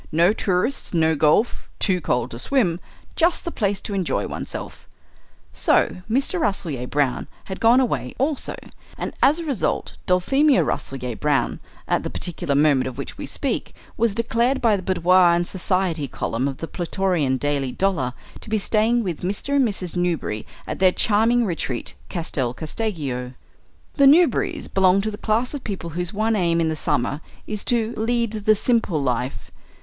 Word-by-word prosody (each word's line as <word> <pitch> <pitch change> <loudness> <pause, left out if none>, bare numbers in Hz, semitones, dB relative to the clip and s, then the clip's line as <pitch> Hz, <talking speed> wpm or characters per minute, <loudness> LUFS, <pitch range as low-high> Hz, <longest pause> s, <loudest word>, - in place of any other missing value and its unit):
No 170 +5 +4
tourists, 195 +2 -1
no 160 -1 +3
golf, 155 +10 +2
too 185 -3 +1
cold 125 -4 -1
to 115 - -7
swim 180 - +2 0.4
just 340 +1 +2
the 340 - -3
place 200 -6 -1
to 205 - -6
enjoy 190 -4 -1
oneself." - - -7 0.7
So - - +2
Mr. 275 - +1
Rasselyer 165 - -2
Brown 140 -3 0 0.2
had 190 - -7
gone 235 +3 +5
away 255 -3 -1
also, 280 +1 -1 0.4
and - - -4
as 295 +4 +5
a 340 - -4
result 275 -9 -2
Dulphemia 270 +11 +3
Rasselyer 125 -3 -3
Brown, 140 -3 0 0.3
at - - +1
the - - -4
particular 155 -5 -2
moment 140 -3 +3
of 130 -1 -7
which 140 - -7
we - - -5
speak, - - -3 0.2
was 225 -3 +1
declared 235 +3 +1
by 225 -3 +3
the 195 - -3
Boudoir 180 -1 +4
and 175 0 0
Society 185 -5 -1
column 125 +1 -2
of 135 -1 -4
the 165 - -5
Plutorian 175 -7 0
Daily 140 -1 -1
Dollar 150 -8 0 0.3
to - - -11
be 220 - +1
staying 225 +3 +2
with 175 -6 -4
Mr. 205 +10 -1
and 265 -3 +4
Mrs. 185 -5 -3
Newberry 170 -12 -1 0.2
at - - -5
their 185 -1 +5
charming 225 +5 +3
retreat, 160 - -3 0.2
Castel 135 -8 -2
Casteggio. 145 - -4 0.6
The 280 -1 +6
Newberrys 330 +5 +3
belonged 190 0 +3
to 215 - -1
the 205 - -7
class 230 +5 0
of 285 - -5
people 185 -5 -5
whose 175 +2 -3
one 220 +2 0
aim 170 -4 +2
in 165 -1 +1
the 160 - -1
summer 140 0 -1 0.2
is 210 -1 -3
to 235 -1 +1
lead 235 0 0
the 215 0 +3
simple 220 -7 +1
life. 125 -5 -2
185 Hz, 170 wpm, -22 LUFS, 150-225 Hz, 0.7 s, The